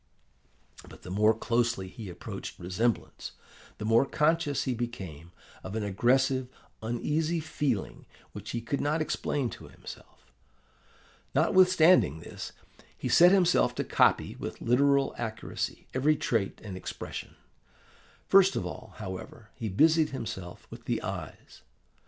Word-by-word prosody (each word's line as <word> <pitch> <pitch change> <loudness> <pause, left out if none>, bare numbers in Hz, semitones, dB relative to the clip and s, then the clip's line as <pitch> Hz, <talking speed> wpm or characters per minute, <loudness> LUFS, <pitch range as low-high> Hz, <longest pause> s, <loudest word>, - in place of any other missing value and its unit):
"But - - -14
the 90 - -8
more 105 +3 +4
closely 115 -4 0
he 105 +1 -9
approached 90 - -7
resemblance, 105 +7 -2 0.4
the 105 - -5
more 115 +3 +5
conscious 150 -1 +1
he 130 - -1
became 95 -10 -6 0.3
of 95 +3 -6
an 110 - -1
aggressive, 130 +6 +2 0.3
uneasy 150 +9 -1
feeling 150 -8 -2 0.2
which 105 +1 -8
he 120 - -3
could 125 +5 -2
not 150 +2 +1
explain 145 -4 -1
to - - -10
himself. - - -13 1.0
Notwithstanding 180 - +5
this, - - -8 0.5
he - - -3
set 175 +1 +7
himself 180 -3 +3
to - - -1
copy - - +2
with - - -6
literal 140 +3 +3
accuracy 110 -2 -4
every 145 +4 +3
trait 115 -8 -1
and 100 -4 -6
expression. 95 - -7 0.9
First 195 0 +6
of - - -1
all, 110 -4 -8
however, 105 +4 -8
he 110 - -4
busied 155 - +4
himself 95 -9 -6
with - - -10
the - - 0
eyes. - - -7
120 Hz, 130 wpm, -29 LUFS, 105-150 Hz, 1.0 s, set